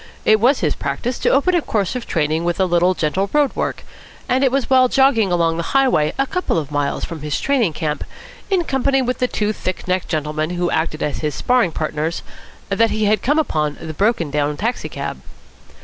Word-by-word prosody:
It 215 Hz, 0 st, +5 dB
was 250 Hz, +5 st, +3 dB
his 155 Hz, -5 st, +1 dB
practice 235 Hz, -, -3 dB
to -, -, +2 dB
open 285 Hz, +7 st, +3 dB
a 350 Hz, -, +3 dB
course 205 Hz, -, -1 dB
of 250 Hz, -, -5 dB
training 155 Hz, 0 st, 0 dB
with 175 Hz, +1 st, -1 dB
a 190 Hz, -, +4 dB
little 175 Hz, +1 st, +2 dB
gentle 185 Hz, +6 st, -1 dB
road 295 Hz, -2 st, +2 dB
work; -, -, -3 dB, 0.4 s
and 260 Hz, +1 st, +2 dB
it 265 Hz, -, +3 dB
was 275 Hz, -1 st, 0 dB
while 260 Hz, -1 st, +5 dB
jogging 250 Hz, -7 st, +3 dB
along 165 Hz, -2 st, +1 dB
the 170 Hz, -, -4 dB
highway 250 Hz, -, +3 dB
a 270 Hz, -, +2 dB
couple 360 Hz, -, -1 dB
of 150 Hz, -3 st, -3 dB
miles 145 Hz, -1 st, -1 dB
from 165 Hz, -4 st, -8 dB
his 150 Hz, 0 st, -2 dB
training 250 Hz, -, +1 dB
camp, 150 Hz, -2 st, -3 dB, 0.5 s
in 380 Hz, -3 st, +2 dB
company 270 Hz, -2 st, +1 dB
with 250 Hz, 0 st, -2 dB
the 250 Hz, -, +2 dB
two 210 Hz, -3 st, -1 dB
thick 185 Hz, -3 st, -5 dB
necked 185 Hz, 0 st, 0 dB
gentlemen 155 Hz, 0 st, -2 dB
who 175 Hz, 0 st, 0 dB
acted 160 Hz, -1 st, -1 dB
as 150 Hz, -, -2 dB
his 150 Hz, -3 st, -2 dB
sparring 245 Hz, -8 st, +2 dB
partners, 155 Hz, +1 st, -3 dB, 0.5 s
that 225 Hz, +3 st, +2 dB
he 215 Hz, 0 st, 0 dB
had 210 Hz, +1 st, +2 dB
come 290 Hz, +5 st, +1 dB
upon 150 Hz, -, 0 dB
the 160 Hz, -1 st, -6 dB
broken 195 Hz, -4 st, 0 dB
down 150 Hz, 0 st, 0 dB
taxi 230 Hz, +3 st, -2 dB
cab. -, -, -5 dB
190 Hz, 210 wpm, -19 LUFS, 155-255 Hz, 0.5 s, It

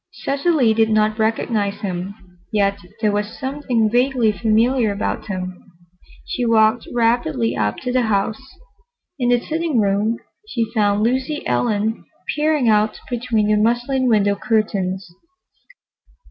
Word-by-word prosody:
Cecily 275 Hz, -4 st, +1 dB
did 220 Hz, 0 st, +2 dB
not 215 Hz, 0 st, +2 dB
recognize 220 Hz, -2 st, 0 dB
him, 185 Hz, 0 st, -4 dB, 0.4 s
yet 200 Hz, -1 st, +1 dB, 0.2 s
there 210 Hz, -2 st, +2 dB
was 205 Hz, +2 st, -3 dB
something 265 Hz, -5 st, 0 dB
vaguely 245 Hz, 0 st, +2 dB
familiar 225 Hz, +2 st, +2 dB
about 200 Hz, +2 st, -3 dB
him. 185 Hz, -2 st, -5 dB, 0.6 s
She 250 Hz, -, -3 dB
walked 225 Hz, 0 st, +3 dB
rapidly 225 Hz, -, +1 dB
up 105 Hz, -1 st, -1 dB
to 250 Hz, -, -2 dB
the 255 Hz, 0 st, +2 dB
house. 215 Hz, +1 st, 0 dB, 0.8 s
In 245 Hz, -1 st, +1 dB
the 245 Hz, 0 st, +4 dB
sitting 315 Hz, -1 st, -1 dB
room 205 Hz, +3 st, +1 dB, 0.3 s
she 230 Hz, -, -2 dB
found 205 Hz, -2 st, +2 dB
Lucy 260 Hz, +5 st, -1 dB
Ellen 205 Hz, -, 0 dB, 0.3 s
peering 300 Hz, -4 st, +1 dB
out 215 Hz, 0 st, +2 dB
between 235 Hz, -3 st, 0 dB
the 210 Hz, -, +3 dB
muslin 240 Hz, +4 st, +1 dB
window 205 Hz, -3 st, +3 dB
curtains. 200 Hz, -4 st, -1 dB
220 Hz, 130 wpm, -20 LUFS, 205-245 Hz, 0.8 s, the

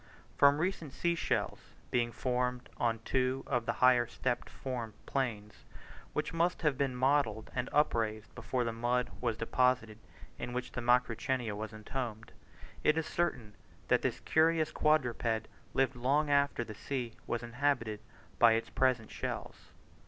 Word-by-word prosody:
From 140 Hz, 0 st, +6 dB
recent 165 Hz, -4 st, -2 dB
sea 170 Hz, +3 st, +1 dB
shells 170 Hz, -, -1 dB, 0.3 s
being 120 Hz, -1 st, +1 dB
found 125 Hz, 0 st, -1 dB
on 115 Hz, -2 st, 0 dB
two 130 Hz, 0 st, +1 dB
of 120 Hz, -4 st, -1 dB
the -, -, +1 dB
higher 125 Hz, -2 st, +5 dB
step 125 Hz, -1 st, -2 dB
formed 120 Hz, -5 st, -5 dB
plains, 105 Hz, -6 st, -3 dB, 0.5 s
which -, -, -2 dB
must 170 Hz, +1 st, +1 dB
have 150 Hz, -3 st, +3 dB
been 135 Hz, -1 st, 0 dB
modelled 125 Hz, -4 st, +1 dB
and 125 Hz, 0 st, -2 dB
upraised 115 Hz, -8 st, +1 dB
before 125 Hz, +1 st, -2 dB
the 115 Hz, -1 st, -2 dB
mud 120 Hz, +2 st, 0 dB
was 115 Hz, -3 st, 0 dB
deposited 115 Hz, -2 st, +1 dB, 0.4 s
in 120 Hz, 0 st, -4 dB
which 125 Hz, 0 st, -3 dB
the 125 Hz, -, -4 dB
Macrauchenia 120 Hz, -1 st, +1 dB
was 110 Hz, +1 st, -5 dB
entombed, 110 Hz, +1 st, -5 dB, 0.5 s
it 155 Hz, -, +4 dB
is 160 Hz, -, 0 dB
certain 140 Hz, -13 st, -1 dB, 0.4 s
that -, -, +4 dB
this -, -, -1 dB
curious 160 Hz, 0 st, +3 dB
quadruped 120 Hz, -7 st, +1 dB, 0.3 s
lived 135 Hz, 0 st, +2 dB
long 140 Hz, +5 st, +1 dB
after 140 Hz, -3 st, +3 dB
the 110 Hz, -, -8 dB
sea 120 Hz, +1 st, -4 dB
was 120 Hz, 0 st, -2 dB
inhabited 120 Hz, -3 st, 0 dB, 0.4 s
by 115 Hz, -1 st, +7 dB
its 115 Hz, 0 st, -1 dB
present 125 Hz, -4 st, +1 dB
shells. -, -, -5 dB
125 Hz, 150 wpm, -32 LUFS, 115-140 Hz, 0.5 s, by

